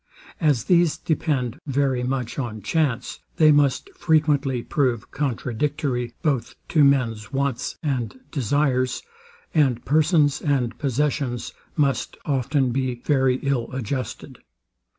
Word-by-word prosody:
As 145 -9 +2
these 175 -3 +3
depend 140 -5 -1
very 135 -2 +1
much 125 -1 -2
on 110 -5 -4
chance, 130 +1 -1 0.2
they 155 -1 +6
must 145 - +3
frequently 150 - +2
prove 125 -6 -1
contradictory 130 -1 -2
both 135 -7 0
to 155 -3 +4
men's 120 -7 +2
wants 135 -2 -2
and 130 -5 -2
desires; 130 -1 0 0.5
and 135 -7 +2
persons 150 0 +3
and 130 -5 0
possessions 135 -3 -1 0.2
must 140 -4 0
often 135 -1 +1
be 130 0 -1
very 135 -3 +3
ill 135 -4 0
adjusted. 130 -1 -4
135 Hz, 110 wpm, -23 LUFS, 125-150 Hz, 0.5 s, they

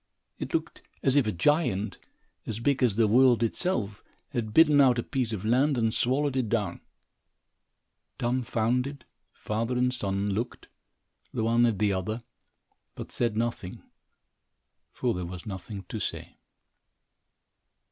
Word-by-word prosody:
It - - -5
looked - - -3 0.2
as 135 - +3
if 140 -6 +4
a - - +1
giant, 110 - +1 0.5
as 110 0 -3
big 135 +3 +1
as 120 -6 +3
the 110 0 +4
world 120 +1 +5
itself, 115 - -1 0.3
had 120 -6 -3
bitten 150 +1 +6
out 125 -3 +5
a 120 - 0
piece 125 -4 -2
of 105 -2 -4
land 130 +5 +3
and 115 -2 +1
swallowed 135 +2 +1
it 125 -5 0
down. 105 -6 -1 1.4
Dumbfounded, 125 +2 -1 0.3
father 115 +4 -2
and 125 0 +2
son 100 -3 -1
looked, 115 +5 -4 0.6
the - - -2
one 115 +1 +4
at 110 -4 0
the 100 0 +2
other, 110 +5 -3 0.7
but - - -8
said 115 -3 0
nothing, 115 -5 -3 1.1
for 125 -2 -1
there 90 - -4
was 90 0 -7
nothing 100 0 -6
to - - -4
say. - - -5
115 Hz, 140 wpm, -28 LUFS, 105-130 Hz, 1.4 s, bitten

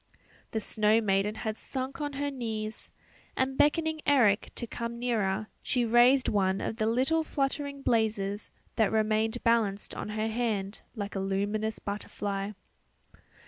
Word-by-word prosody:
The 220 - -1
snow 215 +1 +3
maiden 205 0 +1
had 220 0 -4
sunk 265 +3 -4
on 290 -1 -2
her 285 +1 -2
knees, 220 -4 -4 0.5
and 265 0 +1
beckoning 315 +2 +2
Eric 235 -8 +4
to 235 - -2
come 235 0 -5
nearer, 215 -4 0 0.2
she 245 -2 +1
raised 240 +3 +5
one 195 -2 +2
of 220 - -3
the 220 -1 +1
little 265 +8 +2
fluttering 280 -1 -2
blazes 210 -4 0 0.3
that 220 -3 +3
remained 220 +1 +1
balanced 220 -4 +2
on - - -5
her 215 +1 -1
hand 215 -3 -2
like 205 -2 -4
a 195 - -2
luminous 205 +3 -1
butterfly. 200 0 -4
220 Hz, 145 wpm, -29 LUFS, 210-255 Hz, 0.5 s, raised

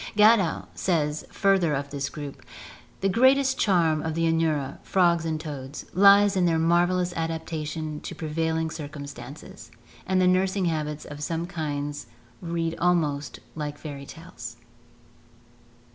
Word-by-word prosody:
Gadow 210 -4 +4
says 155 -4 -1
further 190 -7 +2
of 140 +1 -4
this 140 -1 -3
group: 145 -2 -8 0.6
"The 195 - +2
greatest 265 +6 +4
charm 165 -6 +3
of 160 0 -3
the 165 - 0
Anura 160 -4 0
[frogs 170 -3 +2
and 160 -1 -1
toads] 145 -2 -7
lies 200 +2 +6
in 185 -2 +3
their 165 -1 +2
marvellous 175 +2 +2
adaptation 160 -2 -4
to - - -7
prevailing 160 +1 -1
circumstances; 145 -3 -9 0.4
and 185 0 +2
the 185 - +4
nursing 185 +1 +2
habits 150 -2 -2
of 145 0 -9
some 165 +2 -2
kinds 145 -4 -4 0.3
read 165 -1 -2
almost 150 -6 0
like 150 -2 -5
fairy 140 -3 -8
tales." 140 -9 -9
160 Hz, 130 wpm, -26 LUFS, 150-180 Hz, 0.6 s, lies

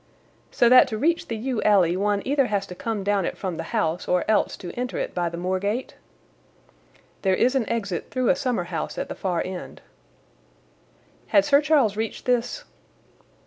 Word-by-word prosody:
"So 240 - +3
that 250 +1 +7
to 220 - -4
reach 330 +8 +1
the 225 - -3
yew 245 0 -2
alley 185 -5 +4
one 200 +1 0
either 275 -1 +2
has 200 -3 -1
to 180 - -9
come 215 +2 -4
down 200 -1 +1
it - - -3
from 185 -4 -4
the - - -5
house 180 -7 -1
or 180 -1 +1
else 215 - +1
to 175 - -7
enter 250 0 -4
it - - -3
by 175 -1 -1
the 170 - -7
moor 185 +2 -1
gate?" 210 +6 -3 1.3
"There 190 -2 +2
is 250 +6 +2
an 260 -5 0
exit 200 -7 -3
through 255 -2 0
a - - +5
summer 250 -8 -1
house 170 -3 -5
at - - -4
the - - -3
far 180 -3 -2
end." 185 -1 -7 1.5
"Had 300 - +4
Sir 285 0 +5
Charles 280 -9 +2
reached 220 0 -4
this?" 250 - 0
215 Hz, 190 wpm, -24 LUFS, 185-250 Hz, 1.5 s, that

